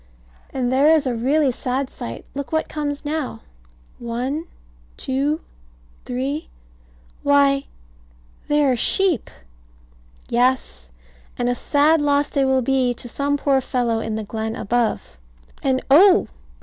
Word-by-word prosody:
And 255 Hz, -2 st, -2 dB
there 290 Hz, +5 st, +5 dB
is 305 Hz, -2 st, +1 dB
a 255 Hz, -, 0 dB
really 270 Hz, +4 st, +2 dB
sad 255 Hz, +2 st, -2 dB
sight. 115 Hz, -, -8 dB
Look 280 Hz, 0 st, -5 dB
what 315 Hz, 0 st, 0 dB
comes 295 Hz, -1 st, -4 dB
now. 300 Hz, -2 st, -3 dB, 0.6 s
One 250 Hz, +7 st, -3 dB, 0.5 s
two 280 Hz, +4 st, -1 dB, 0.6 s
three. 270 Hz, +5 st, -3 dB, 0.7 s
Why, 280 Hz, -1 st, +3 dB, 0.8 s
they 295 Hz, 0 st, +3 dB
are 260 Hz, -2 st, +3 dB
sheep. 355 Hz, -, +2 dB, 1.0 s
Yes. 240 Hz, -, 0 dB, 0.5 s
And 245 Hz, -, -1 dB
a -, -, +2 dB
sad 295 Hz, +5 st, +2 dB
loss 285 Hz, 0 st, +2 dB
they 275 Hz, -2 st, +1 dB
will 265 Hz, -1 st, +2 dB
be 255 Hz, -1 st, +1 dB
to 245 Hz, -, -5 dB
some 285 Hz, +4 st, -1 dB
poor 275 Hz, -2 st, +2 dB
fellow 245 Hz, -3 st, 0 dB
in 220 Hz, -1 st, -3 dB
the 220 Hz, -, -3 dB
glen 220 Hz, +1 st, -4 dB
above. 230 Hz, -, -1 dB, 0.4 s
And 260 Hz, -1 st, 0 dB
oh! 365 Hz, +7 st, +7 dB
270 Hz, 130 wpm, -21 LUFS, 245-290 Hz, 1.0 s, oh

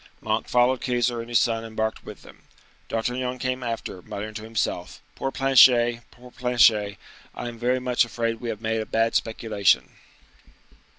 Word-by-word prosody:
Monk 110 Hz, +1 st, -2 dB
followed 125 Hz, +1 st, +2 dB
Keyser 120 Hz, -1 st, 0 dB
and 115 Hz, +1 st, -7 dB
his 120 Hz, -, +3 dB
son 115 Hz, 0 st, +1 dB
embarked 110 Hz, -1 st, -3 dB
with -, -, -11 dB
them. -, -, -16 dB, 0.5 s
D'Artagnan 125 Hz, +2 st, -2 dB
came 130 Hz, 0 st, -2 dB
after, 115 Hz, -6 st, -5 dB
muttering 105 Hz, +4 st, -7 dB
to 110 Hz, -, -6 dB
himself,—"Poor 115 Hz, +4 st, -4 dB
Planchet! 125 Hz, -3 st, +5 dB
poor 125 Hz, 0 st, -16 dB
Planchet! 115 Hz, -5 st, +3 dB, 0.4 s
I 120 Hz, -, -5 dB
am 115 Hz, -1 st, -8 dB
very 125 Hz, +2 st, +1 dB
much 125 Hz, -1 st, +2 dB
afraid 115 Hz, -1 st, -3 dB
we 120 Hz, -, -4 dB
have 110 Hz, -1 st, -5 dB
made 110 Hz, 0 st, -1 dB
a 110 Hz, -, -6 dB
bad 115 Hz, 0 st, +1 dB
speculation." 100 Hz, -, +1 dB
115 Hz, 160 wpm, -24 LUFS, 110-125 Hz, 0.5 s, Planchet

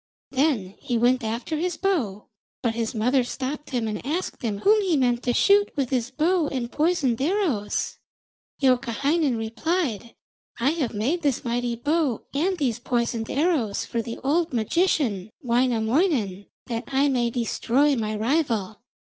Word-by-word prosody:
Then 260 Hz, -9 st, +1 dB
he 250 Hz, -4 st, -1 dB
went 245 Hz, +2 st, +3 dB
after 230 Hz, +8 st, -2 dB
his 350 Hz, +1 st, -2 dB
bow, 265 Hz, -, -1 dB, 0.4 s
but 235 Hz, -2 st, +1 dB
his 230 Hz, 0 st, -2 dB
mother 250 Hz, +4 st, +2 dB
stopped 270 Hz, +4 st, -5 dB
him 240 Hz, -4 st, -1 dB
and 210 Hz, -1 st, -4 dB
asked 320 Hz, +8 st, -3 dB
him 215 Hz, -4 st, -2 dB
whom 425 Hz, +1 st, +5 dB
he 365 Hz, -6 st, +1 dB
meant 245 Hz, -2 st, +2 dB
to 245 Hz, -, 0 dB
shoot 405 Hz, +8 st, +4 dB
with 275 Hz, -3 st, -1 dB
his 250 Hz, -2 st, 0 dB
bow 330 Hz, +2 st, +1 dB
and 250 Hz, -4 st, -3 dB
poisoned 295 Hz, -7 st, +1 dB
arrows. 305 Hz, -, 0 dB, 0.6 s
Youkahainen 265 Hz, +2 st, +2 dB
replied: 235 Hz, -, -2 dB, 0.4 s
'I 260 Hz, +5 st, +3 dB
have 295 Hz, -8 st, -2 dB
made 270 Hz, +12 st, 0 dB
this 280 Hz, -6 st, 0 dB
mighty 240 Hz, 0 st, -1 dB
bow 290 Hz, 0 st, 0 dB
and 355 Hz, +7 st, +1 dB
these 250 Hz, -7 st, 0 dB
poisoned 235 Hz, -2 st, -1 dB
arrows 280 Hz, -, 0 dB
for 235 Hz, -, -2 dB
the 230 Hz, 0 st, -6 dB
old 320 Hz, +3 st, +1 dB
magician 230 Hz, -, +1 dB
Wainamoinen, 235 Hz, -, +1 dB, 0.2 s
that 230 Hz, 0 st, -4 dB
I 275 Hz, +1 st, +2 dB
may 245 Hz, -4 st, +1 dB
destroy 250 Hz, +4 st, +1 dB
my 215 Hz, -2 st, -2 dB
rival.' 225 Hz, -, 0 dB
255 Hz, 150 wpm, -25 LUFS, 230-305 Hz, 0.6 s, whom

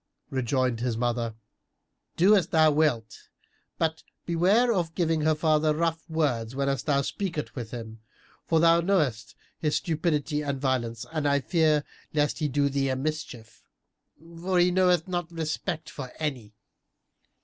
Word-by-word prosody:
Rejoined 130 Hz, -2 st, 0 dB
his 120 Hz, -2 st, -1 dB
mother, 120 Hz, -1 st, -1 dB, 0.8 s
"Do 195 Hz, +5 st, +6 dB
as 180 Hz, -5 st, +2 dB
thou 160 Hz, -2 st, +4 dB
wilt, 145 Hz, -7 st, 0 dB, 0.5 s
but 160 Hz, -1 st, -1 dB, 0.2 s
beware 195 Hz, +8 st, +3 dB
of 170 Hz, -4 st, -2 dB
giving 165 Hz, -3 st, +1 dB
her 155 Hz, +1 st, +3 dB
father 155 Hz, -1 st, +2 dB
rough 165 Hz, 0 st, -1 dB
words, 130 Hz, -7 st, -1 dB
whenas 140 Hz, 0 st, 0 dB
thou 140 Hz, -2 st, +1 dB
speakest 170 Hz, -2 st, -4 dB
with 120 Hz, -5 st, -5 dB
him; 115 Hz, -2 st, -8 dB, 0.5 s
for 165 Hz, -, +3 dB
thou 165 Hz, +1 st, +5 dB
knowest 150 Hz, -, 0 dB, 0.2 s
his 150 Hz, -2 st, 0 dB
stupidity 155 Hz, -3 st, 0 dB
and 140 Hz, -2 st, -3 dB
violence 120 Hz, -4 st, -1 dB
and 155 Hz, -2 st, -1 dB
I 140 Hz, 0 st, +3 dB
fear 155 Hz, 0 st, +2 dB, 0.3 s
lest 150 Hz, -1 st, +1 dB
he 155 Hz, -, +1 dB
do 140 Hz, +1 st, +1 dB
thee 135 Hz, -1 st, 0 dB
a 130 Hz, -, 0 dB
mischief, 135 Hz, -5 st, -5 dB, 0.8 s
for 185 Hz, +1 st, 0 dB
he 175 Hz, +1 st, +4 dB
knoweth 180 Hz, -2 st, +3 dB
not 175 Hz, -2 st, -3 dB
respect 160 Hz, 0 st, -3 dB
for 130 Hz, -3 st, -7 dB
any." 125 Hz, -9 st, -4 dB
150 Hz, 150 wpm, -27 LUFS, 130-165 Hz, 0.8 s, Do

